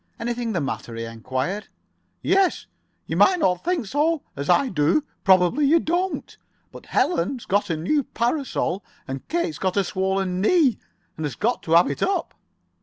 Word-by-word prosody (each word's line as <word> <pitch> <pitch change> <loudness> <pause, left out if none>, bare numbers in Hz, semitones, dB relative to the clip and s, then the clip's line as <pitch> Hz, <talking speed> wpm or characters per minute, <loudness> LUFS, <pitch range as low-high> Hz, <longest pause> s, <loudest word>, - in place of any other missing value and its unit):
"Anything 235 0 -2
the 180 - 0
matter?" 130 -4 -4
he 115 - -4
enquired. 130 - -3 0.6
"Yes. 385 -1 +2 0.4
You - - -3
might 375 -1 +5
not 180 - +1
think 345 -7 0
so. 295 +7 0
As 140 +1 -5
I 275 - +4
do, 165 - +2 0.2
probably 190 - +4
you 310 - +5
wouldn't. 350 +4 -2 0.3
But - - -13
Ellen's 250 - +1
got 200 0 +1
a 165 - 0
new 235 - +1
parasol, 235 - -1 0.2
and 135 0 -6
Kate's 340 -1 -2
got 185 0 -1
a 200 - +4
swollen 190 -1 -1
knee, 275 - +3 0.4
and 160 - -3
has 145 - -7
got 240 +3 0
to 160 - -2
have 170 +1 +6
it 140 - -6
up." 375 -4 0
205 Hz, 170 wpm, -23 LUFS, -, 0.6 s, have